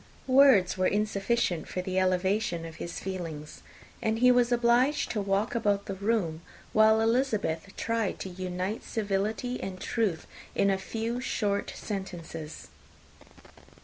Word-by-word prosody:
Words 255 -9 +5
were 185 - +3
insufficient 205 -3 0
for 180 - -4
the 185 0 0
elevation 185 -1 +1
of 165 -1 -9
his 170 - -5
feelings; 165 -6 -6 0.4
and 220 0 0
he 250 +2 +6
was 245 -1 +3
obliged 245 +4 +3
to 215 - -1
walk 200 +3 0
about 205 -4 +1
the 195 - -4
room, 190 -5 -1 0.3
while 220 0 +5
Elizabeth 225 -8 0
tried 230 -4 -1
to 190 - -4
unite 185 +3 -4
civility 215 +3 -2
and 185 -1 -5
truth 200 -8 -1 0.3
in 200 - +3
a 190 - 0
few 225 +4 -3
short 205 -5 -1
sentences. 170 -6 -6
200 Hz, 135 wpm, -28 LUFS, 185-230 Hz, 0.4 s, he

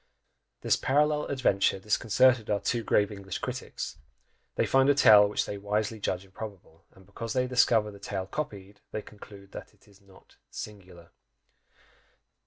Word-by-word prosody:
This - - +2
parallel 150 +2 +1
adventure 115 -9 +1
disconcerted 115 +4 +2
our 105 - +1
two 115 +4 -1
grave 105 -1 +2
English 100 -2 -6
critics - - -6 0.6
they - - +1
find 135 +1 +3
a 145 - +5
tale 105 -6 +7
which 105 - -1
they 100 - -6
wisely 105 +2 -2
judge 95 -1 -2
improbable, 95 -4 -11
and 95 0 -18
because 110 +4 -6
they 125 -1 +1
discover 120 -4 +2
the 100 - -13
tale 100 -1 -4
copied, 100 -4 -6
they 105 - -5
conclude 100 -1 -14
that - - -10
"it - - -27
is 100 0 -21
not 95 -1 -21
singular!" 90 -5 -10
105 Hz, 155 wpm, -28 LUFS, 100-115 Hz, 0.6 s, tale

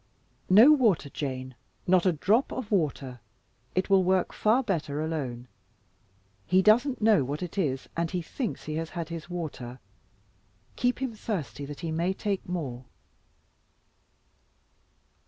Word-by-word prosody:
"No 220 +10 +8
water, 215 - +3
Jane, 130 -2 -4 0.3
not 185 0 +4
a - - +5
drop 205 - +2
of 245 -5 -5
water! 140 -9 -1 0.6
It 185 - +1
will 195 -1 +4
work 185 0 +1
far 230 +5 +2
better 155 - -2
alone. 135 -6 -3 1.0
He 185 +2 +4
doesn't 240 +4 +3
know 215 -8 +5
what 145 +6 -4
it 180 - -6
is, 140 -9 -1
and 170 0 -1
he 180 - -2
thinks 235 - -4
he 155 0 -4
has 165 0 -3
had 170 -3 -5
his 165 0 -7
water. 140 -8 -6 1.0
Keep 245 +1 0
him 255 -3 -2
thirsty 185 - -4
that 145 +2 -8
he 165 -2 -3
may 170 +4 0
take 200 -3 -3
more." 135 -8 -4
175 Hz, 140 wpm, -28 LUFS, 145-205 Hz, 1.0 s, No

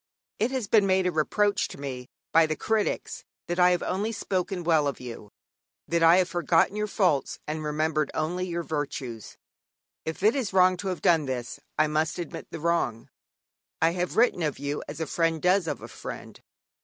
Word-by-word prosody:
It 225 - +2
has 260 -5 -2
been 205 -1 +4
made 190 -1 +3
a 180 - +2
reproach 200 +6 +1
to - - -11
me 130 -3 -6 0.2
by 165 0 +5
the 155 - -1
critics 220 +3 -1 0.2
that 175 +1 -3
I 180 0 +7
have 180 -1 +1
only 205 +4 -1
spoken 190 -3 -2
well 160 -3 +3
of 140 - -3
you, 115 -4 -8 0.6
that 170 0 +1
I 165 +2 +7
have 185 -2 +3
forgotten 175 +2 +2
your 210 0 -1
faults 180 -10 +1
and 155 +1 -3
remembered 155 0 0
only 180 +4 -1
your 170 -1 -3
virtues. 140 -7 -5 0.7
If 160 +4 -5
it 215 +5 +5
is 245 -9 -2
wrong 185 -1 +5
to 195 - -5
have 185 -2 -3
done 165 -3 +4
this, 125 -2 -4 0.2
I 155 - +4
must 155 +1 0
admit 175 -3 -6
the - - -7
wrong. 170 -8 -1 0.7
I 165 +1 +4
have 180 +1 -3
written 230 -6 +4
of 150 -4 -1
you 145 +1 -3
as 145 - -7
a 160 - -1
friend 165 0 0
does 180 +1 +2
of - - -4
a - - -6
friend. - - -9
170 Hz, 195 wpm, -27 LUFS, 155-185 Hz, 0.7 s, I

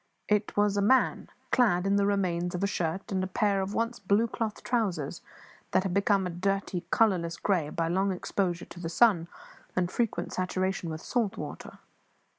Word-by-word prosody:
It 210 0 0
was 205 -1 +3
a - - +3
man, 255 +6 +3 0.2
clad 200 -8 +3
in 195 0 +2
the 200 0 +3
remains 180 -3 0
of 180 - -2
a - - +4
shirt, 185 +2 -2
and 190 -1 0
a - - -1
pair 200 +1 +1
of 190 +2 -3
once 230 +1 -1
blue 205 +4 +2
cloth 220 -1 -4
trousers 195 - -1 0.5
that - - +4
had 190 -2 -2
become 200 0 +2
a 180 - -3
dirty, 190 0 -1
colourless 180 -7 +2
grey 175 -7 0
by 165 +1 -1
long 190 +3 +1
exposure 180 -1 -2
to 175 - -12
the 165 -2 -4
sun 175 -3 +4 0.5
and 180 -1 0
frequent 235 -3 -1
saturation 185 -1 -1
with 160 0 -5
salt 230 -5 -1
water. - - -7
195 Hz, 185 wpm, -29 LUFS, 175-205 Hz, 0.5 s, a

